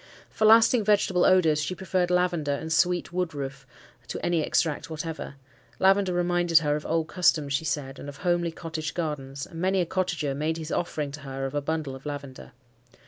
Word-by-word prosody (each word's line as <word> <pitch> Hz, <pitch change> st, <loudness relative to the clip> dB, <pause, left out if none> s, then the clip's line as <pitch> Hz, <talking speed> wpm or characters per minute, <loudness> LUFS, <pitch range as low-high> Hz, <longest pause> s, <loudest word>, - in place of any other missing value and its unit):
For 220 Hz, -, 0 dB
lasting 225 Hz, +1 st, +6 dB
vegetable 200 Hz, -3 st, +3 dB
odours 165 Hz, -5 st, +4 dB
she 165 Hz, +5 st, -3 dB
preferred 185 Hz, -1 st, -1 dB
lavender 175 Hz, -5 st, +1 dB
and 160 Hz, +3 st, -3 dB
sweet 175 Hz, 0 st, +1 dB
woodroof 140 Hz, -7 st, -4 dB, 0.4 s
to -, -, -5 dB
any 170 Hz, -2 st, +2 dB
extract 155 Hz, +1 st, 0 dB
whatever. 160 Hz, -2 st, -5 dB, 0.4 s
Lavender 195 Hz, 0 st, +3 dB
reminded 175 Hz, -1 st, +2 dB
her 150 Hz, -2 st, +3 dB
of 150 Hz, -, -5 dB
old 160 Hz, 0 st, 0 dB
customs, 155 Hz, -6 st, +2 dB
she 150 Hz, +4 st, 0 dB
said, 140 Hz, -2 st, -3 dB
and 145 Hz, -, -7 dB
of 140 Hz, -, -10 dB
homely 175 Hz, 0 st, 0 dB
cottage 160 Hz, -1 st, -5 dB
gardens, 140 Hz, -5 st, -4 dB
and 165 Hz, -1 st, -9 dB
many 190 Hz, +1 st, +2 dB
a 180 Hz, -, +2 dB
cottager 175 Hz, -5 st, -1 dB
made 155 Hz, +3 st, -1 dB
his 160 Hz, -1 st, -6 dB
offering 150 Hz, -4 st, -2 dB
to 145 Hz, -, -8 dB
her 135 Hz, -1 st, -5 dB
of 135 Hz, -, -4 dB
a 145 Hz, -, 0 dB
bundle 150 Hz, -2 st, -3 dB
of 135 Hz, +2 st, -10 dB
lavender. 140 Hz, -2 st, -7 dB
160 Hz, 190 wpm, -26 LUFS, 145-180 Hz, 0.4 s, lasting